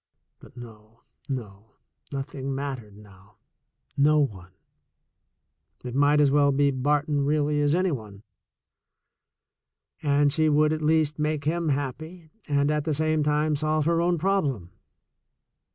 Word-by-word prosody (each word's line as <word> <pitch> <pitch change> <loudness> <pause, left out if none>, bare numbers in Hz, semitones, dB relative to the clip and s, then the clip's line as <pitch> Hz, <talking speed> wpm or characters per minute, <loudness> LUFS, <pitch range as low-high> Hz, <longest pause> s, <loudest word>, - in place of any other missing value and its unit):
But - - -17
no, 110 -1 -13 0.3
no; 110 -5 -7 0.4
nothing 135 -1 -5
mattered 130 -7 -6
now 100 -1 -18 0.3
— - - -39
no 155 0 +4
one 95 -11 -2 0.7
— - - -44
it 125 - -5
might 145 +2 +3
as 145 -2 +4
well 140 0 +4
be 140 +1 +2
Barton 145 +2 0
really 150 0 +1
as 145 +2 +2
any 185 0 +1
one, 105 -6 -7 1.8
and 145 -1 +2
she 155 0 +2
would 150 +1 +3
at 155 - -3
least 155 -1 +1
make 150 -1 -1
him 165 +2 -1
happy 155 +4 -4 0.2
and 145 0 +1
at 150 -1 0
the 155 -1 -1
same 155 +1 +1
time 150 +1 +1
solve 155 +1 0
her 165 +1 +2
own 175 0 +1
problem. 150 - -1
145 Hz, 140 wpm, -25 LUFS, 130-155 Hz, 1.8 s, no